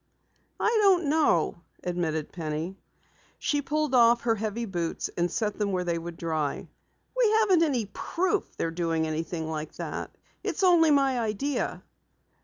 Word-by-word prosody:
"I 450 Hz, 0 st, +2 dB
don't 365 Hz, -7 st, +4 dB
know," 290 Hz, -, +2 dB, 0.2 s
admitted 165 Hz, -4 st, -2 dB
Penny. 160 Hz, +2 st, -4 dB, 0.6 s
She 290 Hz, -1 st, 0 dB
pulled 300 Hz, 0 st, -1 dB
off 235 Hz, -1 st, +6 dB
her 230 Hz, -1 st, +2 dB
heavy 220 Hz, +2 st, -3 dB
boots 175 Hz, -5 st, -3 dB
and 175 Hz, 0 st, +1 dB
set 210 Hz, +3 st, -2 dB
them 205 Hz, -1 st, 0 dB
where 180 Hz, -1 st, 0 dB
they 170 Hz, -1 st, -1 dB
would 170 Hz, 0 st, -7 dB
dry. 155 Hz, -3 st, -2 dB, 0.5 s
"We -, -, +4 dB
haven't 380 Hz, -6 st, +4 dB
any 270 Hz, -9 st, +1 dB
proof 370 Hz, -, -1 dB
they're 165 Hz, -, -1 dB
doing 165 Hz, -1 st, 0 dB
anything 160 Hz, +1 st, -3 dB
like 155 Hz, -1 st, -4 dB
that. -, -, -5 dB, 0.3 s
It's -, -, -2 dB
only 345 Hz, -3 st, +6 dB
my 275 Hz, -3 st, +3 dB
idea." 230 Hz, +6 st, -2 dB
210 Hz, 150 wpm, -27 LUFS, -, 0.6 s, off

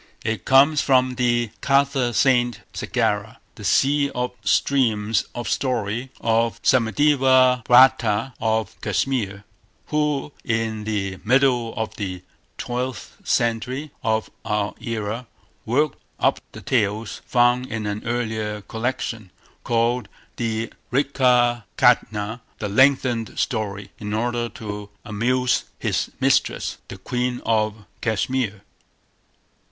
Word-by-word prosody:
It 110 Hz, 0 st, -2 dB
comes 140 Hz, +3 st, +5 dB
from 130 Hz, -2 st, +3 dB
the 120 Hz, -2 st, +1 dB
Katha 135 Hz, -2 st, +2 dB
Sarit 120 Hz, -2 st, +2 dB
Sagara, -, -, -1 dB, 0.2 s
the -, -, -12 dB
"Sea 140 Hz, +1 st, +3 dB
of 125 Hz, 0 st, -1 dB
Streams 110 Hz, -6 st, +2 dB
of 120 Hz, -1 st, -4 dB
Story" 125 Hz, -1 st, -1 dB
of 115 Hz, 0 st, +1 dB
Somadeva 130 Hz, +1 st, +4 dB
Bhatta 120 Hz, -1 st, +5 dB
of 110 Hz, -2 st, -1 dB
Cashmere, 105 Hz, -2 st, -1 dB, 0.5 s
who, 150 Hz, -1 st, 0 dB
in 110 Hz, -2 st, -1 dB
the 95 Hz, -3 st, -2 dB
middle 125 Hz, -1 st, +2 dB
of 110 Hz, 0 st, -4 dB
the 90 Hz, -3 st, -5 dB, 0.3 s
twelfth 125 Hz, 0 st, -4 dB
century 125 Hz, +5 st, -1 dB
of 110 Hz, -1 st, -1 dB
our 105 Hz, -1 st, -1 dB
era, 115 Hz, +1 st, -4 dB, 0.4 s
worked 140 Hz, +5 st, +1 dB, 0.2 s
up -, -, +2 dB
the -, -, -9 dB
tales 105 Hz, -2 st, -1 dB
found 120 Hz, +1 st, +3 dB
in 110 Hz, -3 st, -4 dB
an 105 Hz, +1 st, -3 dB
earlier 110 Hz, -3 st, -2 dB
collection, 115 Hz, -2 st, -4 dB, 0.3 s
called 120 Hz, +1 st, 0 dB, 0.3 s
the 115 Hz, -1 st, -2 dB, 0.2 s
Vrihat 125 Hz, -4 st, +2 dB
Katha, 110 Hz, -2 st, +2 dB, 0.2 s
"the 105 Hz, -, -3 dB
lengthened 125 Hz, 0 st, +2 dB
story", 105 Hz, -4 st, -2 dB
in 105 Hz, 0 st, -3 dB
order 120 Hz, +1 st, -1 dB
to 105 Hz, -2 st, -7 dB, 0.2 s
amuse 125 Hz, +4 st, +1 dB
his -, -, -1 dB
mistress, -, -, +1 dB
the -, -, -8 dB
Queen 125 Hz, +5 st, -2 dB
of 110 Hz, -1 st, 0 dB, 0.2 s
Cashmere. 110 Hz, -2 st, -1 dB
120 Hz, 110 wpm, -23 LUFS, 110-130 Hz, 0.5 s, comes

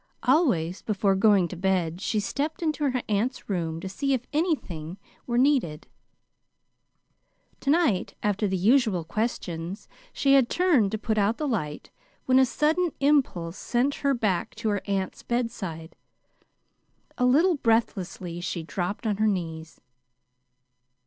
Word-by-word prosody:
Always 245 Hz, -, +2 dB
before 200 Hz, -2 st, +1 dB
going 195 Hz, -3 st, +4 dB
to -, -, -6 dB
bed 180 Hz, -2 st, 0 dB
she 215 Hz, -, 0 dB
stepped 300 Hz, -, -3 dB
into 305 Hz, -3 st, 0 dB
her 255 Hz, -2 st, -2 dB
aunt's 220 Hz, +5 st, -1 dB
room 165 Hz, -5 st, -2 dB
to 190 Hz, -, -5 dB
see 275 Hz, +9 st, -1 dB
if 250 Hz, -1 st, -5 dB
anything 195 Hz, -, -2 dB, 0.3 s
were 240 Hz, -1 st, 0 dB
needed. 245 Hz, -, +2 dB, 1.7 s
To 275 Hz, -, -3 dB
night, 300 Hz, -, +2 dB
after 210 Hz, 0 st, +1 dB
the 190 Hz, -1 st, -1 dB
usual 215 Hz, -2 st, +3 dB
questions, 180 Hz, -2 st, -4 dB, 0.2 s
she 275 Hz, -1 st, +2 dB
had 265 Hz, -3 st, +5 dB
turned 325 Hz, -, +3 dB
to 220 Hz, -, -2 dB
put 215 Hz, 0 st, -1 dB
out 210 Hz, +3 st, +1 dB
the 305 Hz, -, -2 dB
light 155 Hz, -, -3 dB, 0.3 s
when 260 Hz, 0 st, +4 dB
a 260 Hz, -, +5 dB
sudden 320 Hz, +7 st, +1 dB
impulse 250 Hz, -, +1 dB
sent 250 Hz, +4 st, 0 dB
her 280 Hz, -1 st, +2 dB
back 205 Hz, -7 st, -1 dB
to 220 Hz, -, -2 dB
her 205 Hz, -2 st, 0 dB
aunt's 195 Hz, -2 st, -2 dB
bedside. 200 Hz, -9 st, -4 dB, 1.2 s
A 250 Hz, -, +3 dB
little 325 Hz, +9 st, +4 dB
breathlessly 190 Hz, -7 st, -1 dB
she 170 Hz, -1 st, -3 dB
dropped 180 Hz, +7 st, -4 dB
on 210 Hz, -2 st, 0 dB
her 215 Hz, +1 st, +2 dB
knees. 165 Hz, -5 st, -4 dB
215 Hz, 140 wpm, -26 LUFS, 180-265 Hz, 1.7 s, had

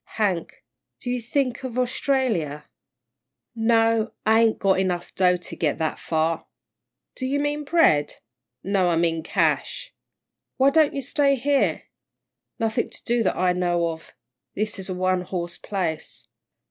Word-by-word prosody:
"Hank, 190 Hz, -6 st, -1 dB, 0.4 s
do 245 Hz, -, -4 dB
you 250 Hz, -1 st, -1 dB
think 255 Hz, +1 st, -1 dB
of 250 Hz, -2 st, -5 dB
Orstralia?" 240 Hz, -, 0 dB, 0.9 s
"No, 225 Hz, -1 st, +2 dB
I 220 Hz, +1 st, +5 dB
ain't 225 Hz, -1 st, +3 dB
got 195 Hz, -1 st, +2 dB
dough -, -, +1 dB
enough 180 Hz, -2 st, -2 dB
to 180 Hz, -1 st, +1 dB
get 155 Hz, -4 st, 0 dB
that 160 Hz, -1 st, -2 dB
far." 160 Hz, 0 st, -1 dB, 0.7 s
"Do 260 Hz, -, -3 dB
you 280 Hz, +2 st, 0 dB
mean 290 Hz, +1 st, -1 dB
bread?" 280 Hz, -, +3 dB, 0.5 s
"No, 190 Hz, -2 st, +2 dB
I 170 Hz, -, +2 dB
mean 165 Hz, -1 st, +1 dB
cash." -, -, -1 dB, 0.6 s
"Why 270 Hz, +1 st, +5 dB
don't 310 Hz, 0 st, +3 dB
you 275 Hz, -, -2 dB
stay 280 Hz, +2 st, +2 dB
here?" 275 Hz, +2 st, +1 dB, 0.7 s
"Nothing 225 Hz, -1 st, -1 dB
to -, -, -13 dB
do 240 Hz, 0 st, +1 dB
that 205 Hz, -, 0 dB
I 180 Hz, -1 st, +2 dB
know 175 Hz, -1 st, +1 dB
of. 160 Hz, -1 st, -8 dB, 0.4 s
This 215 Hz, 0 st, -2 dB
is 190 Hz, -, -5 dB
a 185 Hz, -, -2 dB
one 185 Hz, 0 st, +1 dB
horse 175 Hz, -1 st, -4 dB
place." 175 Hz, -6 st, -4 dB
205 Hz, 150 wpm, -24 LUFS, 175-250 Hz, 0.9 s, I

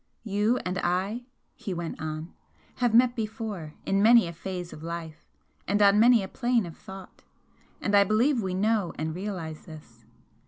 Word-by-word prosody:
"You 210 Hz, +3 st, +1 dB
and 180 Hz, +1 st, -2 dB
I," 195 Hz, +8 st, -1 dB, 0.3 s
he 190 Hz, -4 st, -6 dB
went 170 Hz, -2 st, -5 dB
on 155 Hz, +1 st, -5 dB, 0.4 s
"have 245 Hz, -2 st, +2 dB
met 245 Hz, +1 st, +5 dB
before 215 Hz, -8 st, -5 dB
in 195 Hz, 0 st, +1 dB
many 230 Hz, 0 st, +7 dB
a 170 Hz, -, -6 dB
phase 180 Hz, +1 st, -6 dB
of 150 Hz, -, -11 dB
life 165 Hz, -1 st, -7 dB, 0.4 s
and 205 Hz, +1 st, +1 dB
on 205 Hz, 0 st, +6 dB
many 235 Hz, -1 st, +6 dB
a -, -, -5 dB
plane 240 Hz, -2 st, 0 dB
of 170 Hz, -, -9 dB
thought 190 Hz, -1 st, -12 dB, 0.6 s
and 205 Hz, -, -2 dB
I 200 Hz, -, +7 dB
believe 235 Hz, +5 st, +2 dB
we 185 Hz, -2 st, -2 dB
know 205 Hz, -2 st, +1 dB
and 155 Hz, +1 st, -3 dB
realise 175 Hz, -4 st, -6 dB
this. 155 Hz, -2 st, -13 dB
195 Hz, 170 wpm, -27 LUFS, 170-225 Hz, 0.6 s, many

